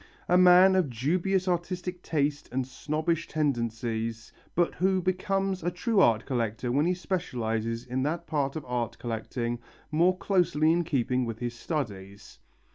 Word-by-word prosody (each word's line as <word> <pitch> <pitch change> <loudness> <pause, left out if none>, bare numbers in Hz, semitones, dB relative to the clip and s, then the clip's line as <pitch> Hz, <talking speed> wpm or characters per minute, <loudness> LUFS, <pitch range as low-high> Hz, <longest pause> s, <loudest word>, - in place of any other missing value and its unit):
A 180 - +3
man 185 +1 +7
of 180 -6 +2
dubious 180 - 0
artistic 180 0 -2
taste 145 -3 -1
and 130 +1 -1
snobbish 155 +5 -2
tendencies 115 -5 -2 0.2
but 175 0 +2
who 190 +1 +1
becomes 190 +1 -1
a 175 - 0
true 200 +5 0
art 115 - +4
lover 120 -2 -1
when 145 +6 +2
he 180 - +2
specializes 115 - -2
in 125 +1 -2
that 160 +5 -2
part 145 -3 -1
of 155 - -5
art 120 -2 -2
collecting 120 +1 -3 0.3
more 175 +4 +3
closely 175 -5 +2
in 170 +1 +2
keeping 130 -5 0
with 115 -2 -4
his 120 0 -3
studies. 100 - -5
150 Hz, 150 wpm, -28 LUFS, 120-180 Hz, 0.3 s, man